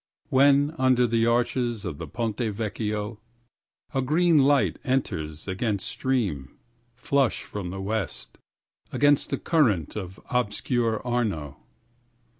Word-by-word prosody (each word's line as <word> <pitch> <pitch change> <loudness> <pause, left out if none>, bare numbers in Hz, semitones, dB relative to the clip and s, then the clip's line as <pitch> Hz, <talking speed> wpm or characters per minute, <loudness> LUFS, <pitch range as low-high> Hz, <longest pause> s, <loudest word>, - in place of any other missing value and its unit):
6When 140 +2 +4
under 130 -1 +4
the 115 0 +2
arches 120 -2 0
of 80 -5 -5
the - - -6
Ponte 115 -4 -3
Vecchio7A 105 -1 -3 0.8
green 160 +3 +3
light 140 0 +3
enters 80 - -2
against 100 +1 -2
stream, 100 - -2 0.4
flush 135 0 +1
from 100 -4 -6
the 95 +2 -6
west,8Against 110 - -2
the - - -1
current 115 - +1
of 95 -3 -6
obscure 120 0 0
Arno 105 - -2
115 Hz, 105 wpm, -26 LUFS, 100-130 Hz, 0.8 s, 6When